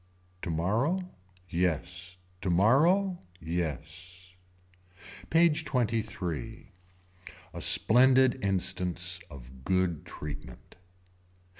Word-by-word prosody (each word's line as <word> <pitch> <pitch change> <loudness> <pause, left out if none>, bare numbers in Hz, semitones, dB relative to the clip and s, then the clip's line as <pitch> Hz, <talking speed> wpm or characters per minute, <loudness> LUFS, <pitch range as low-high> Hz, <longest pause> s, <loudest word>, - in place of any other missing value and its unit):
Tomorrow. 105 - 0 0.5
Yes. 90 +1 -2 0.2
Tomorrow. 145 - +3 0.2
Yes. 90 +3 -5 0.9
PAGE 165 -1 +4
XXIII. 110 - -3 0.8
A - - -6
splendid 130 +2 +4
instance 90 -2 0
of 65 -1 -12
good 90 -3 0
treatment. 75 -1 -9
95 Hz, 60 wpm, -29 LUFS, 85-125 Hz, 0.9 s, PAGE